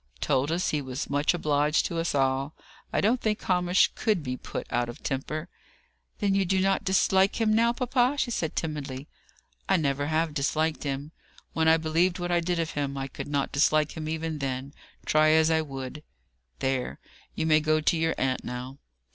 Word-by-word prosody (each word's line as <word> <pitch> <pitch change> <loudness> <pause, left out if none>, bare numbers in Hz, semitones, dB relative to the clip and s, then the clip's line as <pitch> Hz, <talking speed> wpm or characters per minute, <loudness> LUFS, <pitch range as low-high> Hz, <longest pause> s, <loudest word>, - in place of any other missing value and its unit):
"Told 135 - +1
us 175 +2 0
he 150 - 0
was 130 +1 -5
much 145 +4 +2
obliged 150 -2 +1
to 170 - -2
us 165 -2 -1
all. 135 +2 0 0.4
I - - +1
don't 235 +4 +2
think 215 -1 0
Hamish 180 0 +3
could 210 -8 0
be 125 -1 -3
put - - -6
out 120 0 +1
of 120 - -10
temper." 150 +4 -3 0.7
"Then 200 -2 +1
you 195 0 +3
do 190 +1 +1
not 195 0 +1
dislike 190 +1 +3
him 220 -1 +3
now, 230 +2 +4
papa?" 250 +2 +1
she 245 - 0
said, 160 -8 -2
timidly. 145 -3 -4 0.6
"I 195 - +5
never 145 -2 0
have 160 0 0
disliked 155 +3 0
him. 140 +2 -3 0.4
When 160 0 +1
I 160 0 +6
believed 165 +3 +1
what 175 -1 -3
I 175 - +3
did 175 +1 -1
of 165 -1 -1
him, 140 -1 -3
I 135 0 -3
could - - -7
not 145 -1 -1
dislike 150 +1 +3
him 155 -1 -4
even 160 -1 -3
then, 135 0 -4 0.3
try 155 0 +4
as 160 0 +4
I 160 0 +3
would. 135 -1 -6 0.6
There, 130 -1 -1 0.4
you 160 - -1
may 155 -1 +5
go 155 0 +2
to 155 - +2
your 165 0 0
aunt 130 -1 0
now." 125 +2 -6
155 Hz, 195 wpm, -27 LUFS, 140-175 Hz, 0.7 s, I